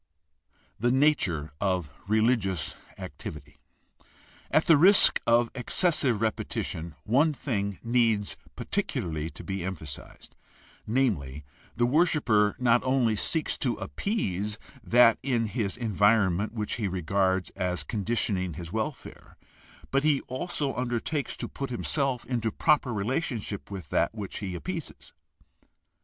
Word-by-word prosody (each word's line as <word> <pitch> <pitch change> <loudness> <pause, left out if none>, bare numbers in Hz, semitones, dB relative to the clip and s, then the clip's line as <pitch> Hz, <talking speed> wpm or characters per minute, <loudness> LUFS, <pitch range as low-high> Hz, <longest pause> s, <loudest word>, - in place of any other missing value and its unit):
d) - - -37 0.3
The - - +4
nature 110 - +2
of 90 -6 0 0.2
religious 110 -5 +1 0.2
activity. 75 -1 -9 0.5
— - - -28
At 155 - +3
the 165 - +7
risk 190 +7 +6
of 120 0 +4
excessive 130 - +1
repetition 85 -7 -3
one 145 +8 +3
thing 100 -9 -2
needs 115 -3 +1 0.2
particularly 80 -1 -2
to - - -11
be 95 -2 -4
emphasized; 80 -6 -7 0.5
namely, 90 - 0 0.3
the 120 - +2
worshiper 125 - +3
not 125 -1 +3
only 130 -4 +2
seeks 155 +9 0
to 125 -4 0
appease 105 - -2 0.3
that 120 -1 +5
in 125 -4 0
his 105 -2 -2
environment 105 -3 +2
which 105 -2 -2
he 110 -4 -1
regards 95 +1 0
as 90 -1 -2
conditioning 100 -5 -1
his 85 0 -7
welfare, 110 +7 -5 0.5
but 135 +1 +2
he 150 -3 +3
also 140 0 -3
undertakes 125 +3 -2
to - - -4
put 135 - -5
himself 130 +1 -1
into 115 -3 -1
proper 145 0 +2
relationship 110 -1 -2
with 95 -3 -7
that - - +1
which 100 -3 -5
he 95 -4 -4
appeases. 85 - -6
110 Hz, 125 wpm, -27 LUFS, 95-130 Hz, 0.5 s, the